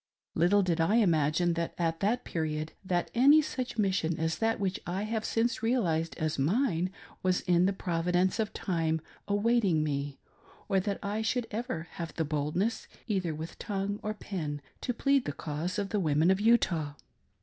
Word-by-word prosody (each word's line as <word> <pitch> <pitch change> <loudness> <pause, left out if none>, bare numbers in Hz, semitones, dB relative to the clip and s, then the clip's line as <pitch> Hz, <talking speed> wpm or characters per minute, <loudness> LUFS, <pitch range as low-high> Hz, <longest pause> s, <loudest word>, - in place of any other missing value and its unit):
Little 195 +5 +4
did 170 -3 +1
I 165 +7 +3
imagine 170 -4 +3
at 165 -1 -1
that 220 +6 +1
period, 155 -1 -2
that 180 -2 -1
any 280 +6 +7
such 255 -5 -4
mission 185 -6 +1
as 160 0 -1
that 225 -1 +1
which 190 -2 -1
I 185 +3 -2
have 220 0 -2
since 230 +1 0
realised 175 -9 0
as 155 -3 -1
mine, 180 - +1 0.3
was 185 -1 +1
in 180 +1 +3
the - - +2
Provi 175 -2 -2
dence 185 +4 +2
of 215 -1 0
Time 165 -4 -1 0.3
awaiting 205 -5 +2
me, 140 -2 -2 0.5
or 195 - +3
that 200 +1 -2
I 205 +2 -1
should 235 +2 0
ever 210 -7 -3
have 165 -1 -5
the 160 - 0
boldness, 155 +9 -1 0.2
either 185 -8 -1
with 160 +2 -7
tongue 200 -1 -2
or 215 0 -3
pen, 155 -9 -4 0.2
to - - -1
plead 275 +2 +2
the 145 - -2
cause 160 +7 -4
of 200 -1 -1
the 210 - 0
Women 160 0 +3
of 190 +1 +1
Utah. 175 -10 +3
185 Hz, 175 wpm, -30 LUFS, 160-215 Hz, 0.5 s, any